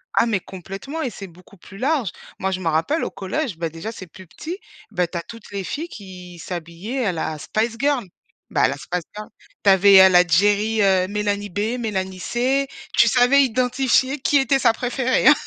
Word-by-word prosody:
Ah - - +4
mais 220 -4 0
complètement 195 - -7
et 260 - -1
c'est 200 -4 -9
beaucoup 180 +3 -18
plus 190 +2 -14
large. 260 - 0 0.3
Moi 190 - -1
je 185 - -2
me 180 - -4
rappelle 165 - +1
au - - -3
collège- 195 - -3
bah 165 0 -2
déjà 165 +7 -7
c'est 185 -5 -10
plus 185 +2 -14
petit- 325 - -7 0.3
bah 180 -4 0
tu 175 - -6
as - - -2
toutes 230 +5 -12
les 200 -1 -4
filles 305 - -4
qui 185 - -11
s'habillaient 175 +9 -5
à 195 - +1
la 160 -1 -3
Spice 225 +8 -2
Girl. 280 -4 +1 0.4
Bah - - +1
à - - +6
la 140 - -2
Spice 175 +4 -4
Girl. 210 0 -7 0.4
Tu 200 - +5
avais, 195 0 +7
heu, - - +7
la 180 0 +5
Geri, 205 +5 +2
heu, 190 -2 +3
Mélanie 205 0 -2
B, 210 +6 -2
Mélanie 190 -5 -3
C, 260 +7 0 0.3
tu 235 - +6
savais 250 +4 +5
identifier 255 +2 +1
qui 285 +2 +2
était 270 0 +2
sa 235 -3 +4
préférée, 250 +2 0
hein. 300 - +10
205 Hz, 210 wpm, -21 LUFS, 185-250 Hz, 0.4 s, hein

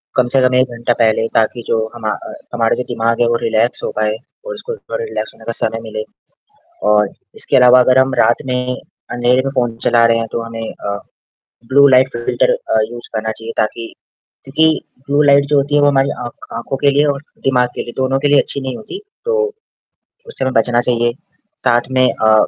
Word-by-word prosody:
कम 125 -1 +3
से 135 - +4
कम 130 0 +3
1 130 0 +3
घंटा 120 +1 +1
पहले 110 0 +2
ताकि 115 +2 +1
जो 115 - +1 0.2
हमा 110 -2 -3
अ, - - -7 0.2
हमारे 115 -1 +1
भी 125 - -2
दिमाग 115 -1 -1
है 120 - +4
वो 120 - +2
रिलैक्स 115 +2 0
हो - - -2
जाए 110 0 0 0.3
और - - -5
उसको 475 +1 -6
थोड़ा 470 +2 -6
रिलैक्स 445 - -5
होने - - -17
का - - -2
समय - - -1
मिले 480 - -5 0.9
और 105 -1 +4 0.3
इसके - - -2
अलावा 125 0 +7
अगर 130 +1 +4
हम 130 0 +2
रात 115 +1 +3
में 125 0 -1 0.4
अंधेरे 120 +1 +2
में 135 - -1
फ़ोन 120 -3 0
चला 120 -1 +4
रहे 115 0 +3
हैं, 115 0 -2
तो 115 - -2
हमें 115 -1 -6 0.2
अ, 100 0 -2 0.7
ब्लू 140 +2 +6
लाइट 130 0 +5
फ़िल्टर 120 - +1
अ, - - -1
यूज़ 120 0 -9
करना 110 0 -2
चाहिए 110 +1 -8
ताकि 115 +1 -2 0.5
क्योंकि 150 +4 +2 0.4
ब्लू 145 +1 +2
लाइट 140 0 +5
जो 145 0 +2
होती 140 +1 +1
है 145 - +4
वो 145 - +5
हमारी 135 -1 +3 0.2
आँख 120 - -10
आँखों 120 +3 -4
के 140 - +3
लिए 145 +2 +3
और 140 -2 -1 0.2
दिमाग 125 -2 +2
के - - -3
लिए 120 - -9
दोनों 135 0 +1
के 145 - +1
लिए 145 - +5
अच्छी 140 - -4
नहीं 130 -1 -4
होती। 370 - -8 0.3
तो 465 -1 +1 0.9
उससे 465 - -4
हमें 130 - 0
बचना 120 +1 +2
चाहिए। 120 -1 +1 0.5
साथ 120 -1 +4
में 130 0 +4 0.2
अ 110 - +6
125 Hz, 215 wpm, -16 LUFS, 115-135 Hz, 0.9 s, अलावा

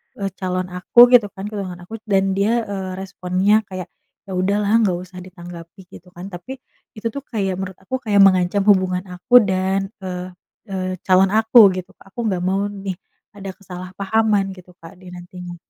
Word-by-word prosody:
eee, 195 -1 -4
calon 185 -1 -2
aku 180 +6 +1
gitu 240 -4 +6
kan 190 - -7
tunangan 185 -4 -6
aku, 225 +3 -7
dan 195 -1 +2
dia, 215 +5 +1
eee, 195 -3 -5
responsnya 190 +2 +1
kayak, 185 -2 -7 0.3
“Ya 195 - -11
udahlah 200 +4 +2
nggak 200 -6 +2
usah 185 0 -11
ditanggapi.” 175 0 -11
Gitu 180 - -14
kan. 185 +3 -9
Tapi 180 +9 -8 0.4
itu 215 +1 -4
tuh 280 - -5
kayak 195 -5 -2
menurut 190 -1 -5
aku 260 +7 -3
kayak 205 -5 +4
mengancam 185 +1 +3
hubungan 185 -3 +3
aku 245 +7 +5
dan 190 0 -1
e 190 - -7 0.6
e - - -3 0.3
calon 190 0 +4
aku 225 +2 +5 0.2
gitu, 185 +1 -7
Kak. 195 - -21
Aku - - -8
nggak 185 - -1
mau 190 +2 0
nih 195 -2 -5 0.4
ada 195 -1 -7
kesalahpahaman 195 +2 -2
gitu, 180 -1 -15
Kak 165 +3 -13
dia 185 -1 -12
nantinya. 180 0 -9
190 Hz, 175 wpm, -20 LUFS, 180-200 Hz, 0.6 s, gitu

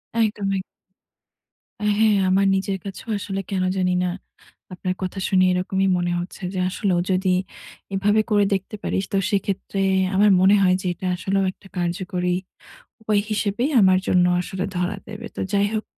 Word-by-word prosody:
একদম, 230 - +3 0.2
একদম। 195 -1 0 1.2
হ্যাঁ, 210 +1 +3
আমার 195 +1 +3
নিজের 195 0 -1
কাছেও 195 +3 -8
আসলে 195 -1 -3
কেন 190 -2 0
জানি 180 -1 +1
না, - - +1 0.7
আপনার 185 0 -2
কথা 185 +1 -3
শুনে 185 -2 +4
এরকমই 190 +1 0
মনে 175 0 -1
হচ্ছে 175 +2 -7
যে 185 - -2
আসলেও 185 -2 0
যদি 185 +1 +1 0.6
এভাবে 205 +3 +3
করে 205 -1 +4
দেখতে 195 +2 -3
পারিস, 190 - -1
তো - - +3
সেক্ষেত্রে 195 0 -2 0.4
আমার 205 +2 +5
মনে 195 +2 +6
হয় 185 -1 +4
যে - - -11
এটা 185 - -8
আসলেও 195 +2 0
একটা 195 - -19
কার্যকরী 180 0 -1 0.7
উপায় 210 -2 +1
হিসেবেই 210 +5 0
আমার 185 -1 +5
জন্য 180 -1 +4 0.2
আসলে 185 +1 -4
ধরা 180 +3 -1
দেবে। 215 -1 -8
তো - - -6
যাই 200 0 +3
হোক 215 - -1
195 Hz, 160 wpm, -22 LUFS, 185-205 Hz, 1.2 s, মনে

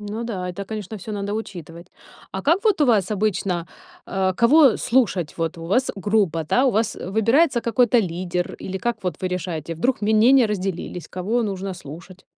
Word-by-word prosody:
Ну 210 +2 -5
да, 185 -6 -4
это, 195 +2 -5
конечно, 215 0 -6
всё 205 +3 -8
надо 205 0 -3
учитывать. 170 -6 -7 0.4
А 190 - -4
как 330 +5 +3
вот 420 -6 +2
у 295 - +5
вас 215 -5 +2
обычно, 195 -4 -1 0.4
э, 190 -1 0
кого 275 +1 +6
слушать? 220 - +1
Вот 165 0 -2
у 165 - -8
вас 250 +9 +1
группа, 195 -5 +1
да? 250 - +2
У - - +4
вас, 220 0 0
э, - - -7
выбирается 235 +6 +3
какой-то 240 +1 +3
лидер? 180 -1 -3
Или 190 0 -5
как 240 +4 -1
вот 180 -2 -2
вы 185 - 0
решаете? 170 -3 -4
Вдруг 240 +11 0
мнения 225 +4 +5
разделились, 190 -4 -4
кого 215 +7 -1
нужно 195 -2 -3
слушать? 175 +3 -11
200 Hz, 185 wpm, -22 LUFS, 180-230 Hz, 0.4 s, кого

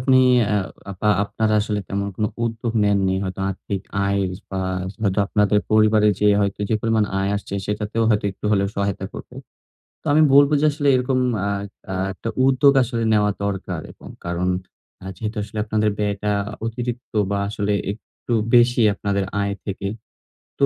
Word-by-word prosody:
আপনি 130 0 +4 0.3
আ 105 - +3 0.4
বা 105 - +1 0.2
আপনারা 110 +1 0
আসলে 105 0 -2
তেমন 100 0 -2
কোনো 105 -1 0 0.2
উদ্যোগ 115 0 -2
নেননি। 100 -2 +2
হয়তো 95 +1 -5
আর্থিক 95 +1 -4 0.2
আয় 100 0 +1 0.3
বা 95 -1 -2 0.4
হয়তো 100 -1 +1
আপনাদের 105 0 +2
পরিবারে 110 0 +4
যে 105 - +3
হয়তো 100 0 -1
যে 110 - +1
পরিমাণ 110 -1 +2
আয় 95 +1 0
আসছে 100 -1 -6
সেটাতেও 105 +2 -1
হয়তো 105 -1 +1
একটু 95 - -18
হলেও 100 -1 +2
সহায়তা 100 -1 -1
করবে। - - -10 0.7
তো - - -38
আমি 155 - +5
বলব 140 +1 +7
যে - - +3
আসলে 145 -1 -2
এরকম 130 +1 +1 0.3
আ - - 0 0.4
আ - - -2 0.2
একটা 115 - -5 0.2
উদ্যোগ 135 +1 +5
আসলে 120 -1 -2
নেওয়া 105 -1 +3
দরকার 95 -4 -3
এবং - - -13 0.2
কারণ 85 +1 -1 0.6
আ - - -9
যেহেতু 105 +3 -5
আসলে 105 +1 -9
আপনাদের 110 0 +1
ব্যয়টা 105 0 -1 0.3
অতিরিক্ত 120 +1 -5 0.2
বা 100 - +1
আসলে 105 -1 -1 0.2
একটু 115 +3 -7 0.2
বেশি 120 0 +5
আপনাদের 100 -1 -1 0.2
আয় 100 0 -1
থেকে 100 -1 -4 0.7
তো - - +5
105 Hz, 165 wpm, -22 LUFS, 100-115 Hz, 0.7 s, বলব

